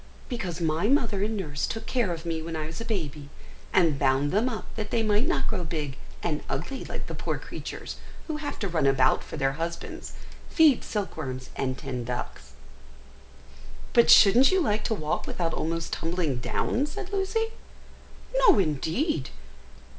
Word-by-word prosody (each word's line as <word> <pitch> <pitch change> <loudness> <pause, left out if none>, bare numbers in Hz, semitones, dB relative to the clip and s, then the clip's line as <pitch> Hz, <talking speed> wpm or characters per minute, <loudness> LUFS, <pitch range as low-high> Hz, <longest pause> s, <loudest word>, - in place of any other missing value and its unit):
"Because 185 - -3
my 165 +3 +1
mother 230 -7 +2
and 215 +1 -1
nurse 145 -7 -2
took 225 0 -4
care 240 -8 +1
of 165 0 -5
me 165 -1 -2
when 165 0 -5
I 155 -1 -2
was 160 +6 -6
a - - -4
baby, 155 -10 -3 0.4
and 165 -7 +3
bound 135 +1 +2
them 220 +6 +2
up 225 -3 -5
that 215 -2 -3
they 230 0 +1
might 215 +5 +2
not 345 -6 +1
grow 195 -5 -1
big 150 -4 -3 0.3
and 155 -3 -1
ugly 175 - -3
like - - -5
the - - -6
poor - - -2
creatures - - -7 0.3
who 310 -2 -3
have 295 -1 -4
to 200 - -2
run 165 -6 +1
about 135 -1 +4
for - - -7
their 135 -2 +2
husbands, 165 +4 -5 0.4
feed 310 -6 +5
silkworms, 140 - -4
and 130 -1 -1
tend 125 -3 -5
ducks!" 95 - -5 1.4
"But 235 - +6
shouldn't 240 +6 +8
you 380 - +4
like 215 - +1
to 220 - +1
walk 155 -5 -2
without 165 -2 -1
almost 165 +1 -2
tumbling 165 -5 -1
down?" 250 - 0
said 405 +4 -7
Lucy. 405 +3 0 0.8
"No, - - +6
indeed! 160 - 0
175 Hz, 170 wpm, -27 LUFS, 150-230 Hz, 1.4 s, shouldn't